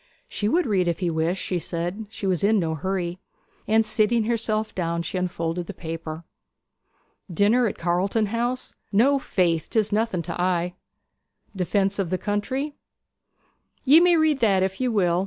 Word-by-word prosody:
She 210 - -2
would 345 +6 +2
read 190 -6 +1
if 170 - 0
he 175 -3 -1
wished, 165 +4 -1
she 180 - -1
said; 175 +6 -4
she 215 -2 -6
was 185 -3 0
in 215 +2 +4
no 165 -4 0
hurry. 180 +2 -3 0.5
And 220 +1 +3
sitting 220 +1 +2
herself 220 -1 -1
down 170 -2 -2
she 170 - -5
unfolded 170 -1 -2
the - - -7
paper. 165 -1 -6 1.1
'"Dinner 215 +7 +3
at 200 - -4
Carlton 185 +6 +1
House"?' 240 +4 -2 0.2
'No, 265 +7 +4
faith. 170 - 0
'Tis 220 -2 +1
nothing 210 -5 0
to 170 +2 -4
I.' 180 -1 0 0.8
'"Defence 195 +2 0
of 190 -4 -1
the 185 - 0
country"?' 260 - -2 1.1
'Ye 290 +5 +8
may 350 0 +5
read 310 -3 +2
that 195 -5 +3
if 190 +4 -2
ye 255 - +2
will. 180 -7 +2
195 Hz, 165 wpm, -24 LUFS, 175-225 Hz, 1.1 s, Ye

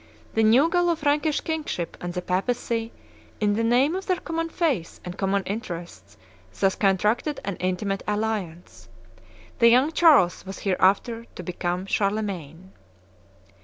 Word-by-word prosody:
The 225 - +2
new 235 +8 +5
Gallo 350 0 +2
Frankish 295 0 +1
kingship 310 - -3
and 175 - -4
the 180 - -3
Papacy, 225 +4 -1 0.5
in 210 -1 +2
the 225 +2 0
name 250 +7 +3
of 380 - -5
their 370 - +2
common 330 0 -3
faith 290 - -1
and 180 0 -6
common 195 0 0
interests, 175 - -7 0.4
thus 190 0 +3
contracted 210 - +1
an 200 -2 -2
intimate 190 +2 -2
alliance. 180 - -3 0.7
The 235 - +7
young 255 +6 +4
Charles 300 - +4
was 195 0 -8
hereafter 200 +5 +1
to 180 - -7
become 180 +1 -3
Charlemagne. 195 -5 -2
210 Hz, 135 wpm, -25 LUFS, 185-260 Hz, 0.7 s, The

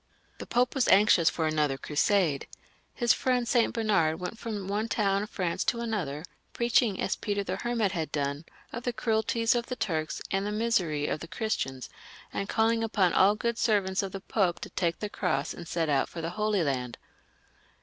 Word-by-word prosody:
The - - -7
Pope 245 +1 +2
was 270 -3 +1
anxious 190 -5 +5
for 160 - -2
another 150 -3 +1
Crusade; 155 +1 +1 0.4
his 240 -2 +3
friend 250 -2 0
St. 235 0 +3
Bernard 190 -9 +1
went 180 +5 -6
from 210 -4 -5
one 210 +3 -1
town 200 -3 +1
of 210 - -5
France 180 -6 -1
to 235 - +1
another, 180 -10 -3 0.3
preaching, 235 -3 +2
as - - 0
Peter 205 -2 -2
the - - -3
Hermit 230 -5 0
had 165 -4 -3
done, 145 +1 -2 0.3
of 235 - -4
the 245 0 -2
cruelties 225 0 +1
of 240 -1 -1
the 255 - -3
Turks, 160 -9 -2
and 195 0 +1
the 205 - -2
misery 200 -10 0
of 150 - -1
the 165 - -8
Christians, 165 - -3 0.5
and 200 - -3
calling 225 0 +2
upon 200 -5 +2
aU 200 +2 +5
good 235 +2 -2
servants 195 -4 +2
of 195 -1 -4
the 195 - -6
Pope 190 -4 0
to - - -7
take 170 -3 0
the 210 - -3
cross 140 -7 -1
and 170 - -9
set 165 -1 -1
out 140 -2 +1
for 170 - -8
the 165 +1 -3
Holy 210 -1 0
Land. 125 -5 -2
200 Hz, 195 wpm, -28 LUFS, 165-225 Hz, 0.5 s, anxious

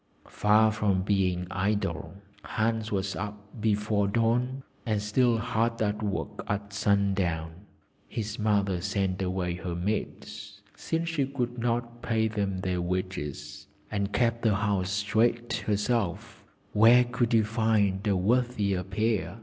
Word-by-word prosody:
Far 110 +1 +4
from 100 -3 +1
being 95 -3 +1
idle, 100 -3 -1 0.3
Hans 110 0 -1
was 100 -1 -1
up 105 0 -5 0.2
before 105 -1 +1
dawn, 120 +5 +1 0.2
and 110 -3 0
still 115 +3 +2
hard 115 0 0
at 105 -1 0
work 105 -2 -3
at 100 0 -3
sundown. 95 -5 +1 0.6
His 110 0 -4
mother 100 -4 +1
sent 95 -1 -1
away 90 -1 -1
her 90 -2 -4
maids, 100 +1 -4
since 165 +1 -2
she 145 -5 0
could 125 -3 -3
not 120 0 -2
pay 110 -2 +1
them 100 -3 -2
their 90 -2 -1
wages, 75 -5 -4 0.2
and 100 -1 -1
kept 115 0 +1
the 110 -3 +3
house 100 -2 0
straight 110 +4 +1
herself; 105 -3 -1 0.3
where 115 +4 +7
could 120 -1 -1
you 115 -2 +5
find 105 -3 +1
a 100 - +3
worthier 105 -2 +1
pair? 105 +3 -1
105 Hz, 135 wpm, -28 LUFS, 95-115 Hz, 0.6 s, where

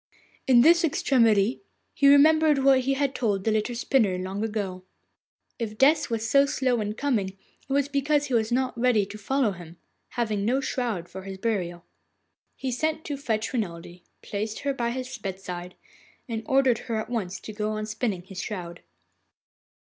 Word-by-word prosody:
In 250 -2 +7
this 335 +5 +6
extremity 230 -7 +2 0.3
he 280 - +3
remembered 305 +1 +6
what 270 -1 +6
he 270 +1 0
had 275 -1 0
told 205 -7 -1
the 220 - +1
little 215 +3 -1
spinner 230 -6 +1
long 190 +3 -4
ago. 200 -4 -3 0.8
If 215 -2 -4
Death 295 +3 +4
was 225 -1 -2
so 275 +4 +4
slow 255 -5 0
in 210 0 -2
coming, 215 -8 -1 0.3
it - - -7
was 280 0 +2
because 290 +1 +1
he 265 - -5
was 225 -1 +1
not 260 +1 0
ready 235 -4 +2
to 205 +2 -9
follow 260 +1 +1
him, 175 -2 -11 0.3
having 215 -5 -1
no 245 +6 +2
shroud 240 -9 -2
for 190 - -9
his 190 0 -7
burial. 180 -5 -2 0.7
He 265 -1 -4
sent 315 +5 -1
to 290 - -3
fetch 225 -6 -2
Renelde, 175 -6 -4 0.2
placed 215 +1 -4
her 280 -1 -1
by 235 -3 -1
his 255 0 -5
bedside, 180 -2 -6 0.5
and 225 -2 -3
ordered 265 -3 +3
her 230 - 0
at 220 - -5
once 195 -6 -3
to 215 - -9
go 210 0 -2
on 215 0 -3
spinning 215 -4 -3
his 190 0 -7
shroud. 175 -5 -6
225 Hz, 175 wpm, -26 LUFS, 200-270 Hz, 0.8 s, In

